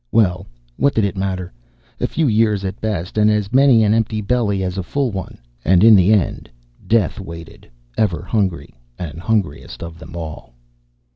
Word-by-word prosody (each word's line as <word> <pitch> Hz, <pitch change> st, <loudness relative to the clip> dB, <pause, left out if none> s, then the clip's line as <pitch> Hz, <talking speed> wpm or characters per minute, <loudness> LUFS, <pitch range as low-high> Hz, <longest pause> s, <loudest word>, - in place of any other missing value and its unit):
Well, 95 Hz, -4 st, +2 dB, 0.3 s
what 140 Hz, -, +2 dB
did 110 Hz, -, +2 dB
it 100 Hz, -, -2 dB
matter? 95 Hz, -3 st, -3 dB, 0.5 s
A -, -, 0 dB
few 160 Hz, -3 st, 0 dB
years 105 Hz, -3 st, +2 dB
at 95 Hz, +2 st, -5 dB
best, 105 Hz, -2 st, -2 dB
and 105 Hz, 0 st, +5 dB
as 105 Hz, 0 st, 0 dB
many 130 Hz, -4 st, +5 dB
an 105 Hz, 0 st, +3 dB
empty 110 Hz, -1 st, 0 dB
belly 105 Hz, -2 st, 0 dB
as 90 Hz, +1 st, -3 dB
a -, -, 0 dB
full 130 Hz, +7 st, -1 dB
one. 95 Hz, -2 st, -6 dB, 0.3 s
And 90 Hz, +4 st, +4 dB
in 110 Hz, -1 st, +8 dB
the 95 Hz, +1 st, +4 dB
end, 100 Hz, -6 st, 0 dB, 0.4 s
Death 110 Hz, -1 st, +1 dB
waited, 85 Hz, -7 st, -10 dB, 0.3 s
ever 90 Hz, -7 st, +1 dB
hungry 95 Hz, -3 st, -2 dB, 0.2 s
and 80 Hz, -2 st, -6 dB
hungriest 95 Hz, -7 st, -2 dB
of 85 Hz, 0 st, -9 dB
them 85 Hz, -, -11 dB
all. 80 Hz, -7 st, -8 dB
100 Hz, 180 wpm, -19 LUFS, 90-110 Hz, 0.5 s, in